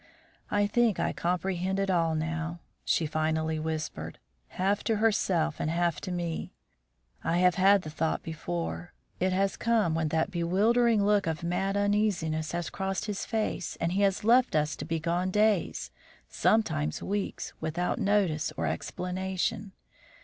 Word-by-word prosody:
"I 205 0 +2
think 225 -1 +2
I - - 0
comprehend 180 +1 -1
it 195 -1 +1
all 165 -3 +2
now," 165 +2 -3 0.2
she 165 - +1
finally 155 +1 0
whispered, 155 -1 -4 0.3
half 195 +2 0
to 225 - +2
herself 185 -7 +1
and 155 - -1
half 170 0 0
to 185 - -5
me. 170 -2 -3 0.7
"I 170 - +1
have 180 0 +5
had 195 +1 +4
the 155 - -6
thought 160 +1 -1
before; 85 - -4 0.3
it 185 +1 +2
has 195 +1 +1
come 225 -7 +1
when 160 -1 0
that 160 +1 0
bewildering 205 +6 +3
look 205 -3 +3
of 160 0 -2
mad 190 +3 0
uneasiness 200 -7 +1
has 175 -1 -3
crossed 195 +1 -2
his 210 -2 -4
face 220 -6 -2
and 170 - -1
he 195 +3 +1
has 200 -1 +2
left 240 -2 +4
us 150 0 +1
to - - -5
be 165 +1 -1
gone 175 +3 0
days, 210 -1 +1 0.4
sometimes 75 - +1
weeks, 200 0 -3
without 165 +6 -1
notice 200 -7 +1
or 85 - -1
explanation. 185 - -2
180 Hz, 155 wpm, -29 LUFS, 160-200 Hz, 0.7 s, have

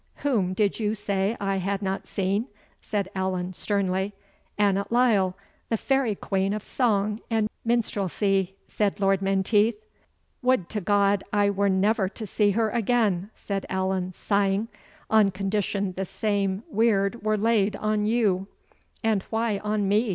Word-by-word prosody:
"Whom 200 -10 +1
did 205 +1 +1
you 215 -1 0
say 200 +1 -1
I 195 -1 0
had 195 +2 -2
not 195 0 -3
seen?" 200 +5 -1 0.3
said 205 -3 -2
Allan, 185 -1 -2
sternly. 195 0 -1 0.4
"Annot 200 0 +1
Lyle, 215 -7 +3 0.3
the 225 - +1
fairy 265 -3 +1
queen 195 0 -1
of 210 -1 -4
song 210 -4 0
and 220 -2 +1 0.2
minstrelsy," 195 -4 0
said 205 -2 -1
Lord 195 -1 +2
Menteith. 200 +3 +2 0.7
"Would 250 -8 +2
to 210 - -3
God 200 +1 +2
I 205 -1 +3
were 200 0 +1
never 195 +1 +2
to 220 +2 -7
see 205 +1 +2
her 215 +2 +1
again," 215 -5 +1
said 200 -1 -4
Allan, 190 -1 -1
sighing, 200 +3 0 0.4
"On 215 -2 +5
condition 195 0 -1
the 190 - -2
same 200 0 -1
weird 215 0 +1
were 215 0 +1
laid 210 -2 +2
on 215 0 0
you!" 205 -5 +1 0.6
"And 220 -3 +2
why 225 -2 0
on 210 -1 -1
me?" 210 +3 +2
200 Hz, 145 wpm, -26 LUFS, 195-215 Hz, 0.7 s, On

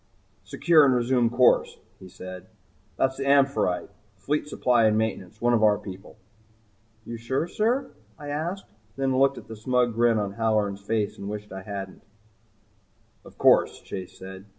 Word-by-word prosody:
"Secure 165 -3 +4
and 135 -3 +4
resume 120 -1 +2
course," 120 +1 +3 0.2
he 95 - -12
said. 95 0 -10 0.5
"That's 130 0 0
the 135 - -3
'Amphitrite' 140 -10 +2 0.3
fleet 145 +10 -2
supply 125 -5 +2
and 110 0 +3
maintenance. 110 -2 -3
One 120 0 +2
of 115 - +3
our 105 -1 +4
people." 95 -2 -11 0.9
"You 115 - -6
sure, 130 +8 -2
sir?" 245 +8 -1 0.3
I 145 -2 -8
asked, 170 +7 -3
and 105 - -33 0.4
then 130 - +1
looked 135 0 +3
at - - -11
the 110 - -8
smug 125 +2 0
grin 115 0 +3
on 100 -2 -2
Halloran's 105 -3 0
face 105 0 -2
and 100 - -6
wished 105 0 -7
I 95 - -7
hadn't 95 -1 -7
asked. 105 - -35 1.1
"Of - - -15
course," - - +4
Chase 95 -2 -8
said. 95 +1 -10
115 Hz, 170 wpm, -25 LUFS, 100-135 Hz, 1.1 s, Secure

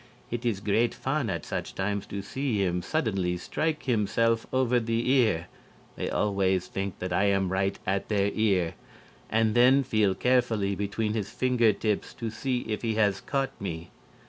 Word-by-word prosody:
It 120 +1 -2
is 100 -4 -1
great 110 +4 +1
fun 135 -3 -1
at - - -3
such - - -4
times 100 +1 -2
to 100 0 -5
see 130 +1 -2
him 90 -3 0
suddenly 95 - -1
strike 155 - -2
himself 115 -1 +1
over 125 -1 +2
the 115 +1 -1
ear 110 -11 +3 0.5
(they - - -3
always 95 -3 +1
think 95 0 -4
that 90 -1 -4
I 95 +3 +3
am 95 -2 +2
right 95 +1 0
at 95 +1 -1
their 100 -1 +2
ear), 95 -6 +1 0.6
and 110 -1 +2
then 130 +4 +5
feel 105 -5 +2
carefully 120 -6 +2
between 105 +2 -2
his 105 -3 -2
finger 125 -3 +2
tips 105 0 -2
to 115 -2 -4
see 125 +2 -2
if 105 -1 -4
he 115 -2 -1
has 100 -3 +2
caught 135 -1 -1
me. 85 -3 -5
105 Hz, 170 wpm, -27 LUFS, 95-120 Hz, 0.6 s, then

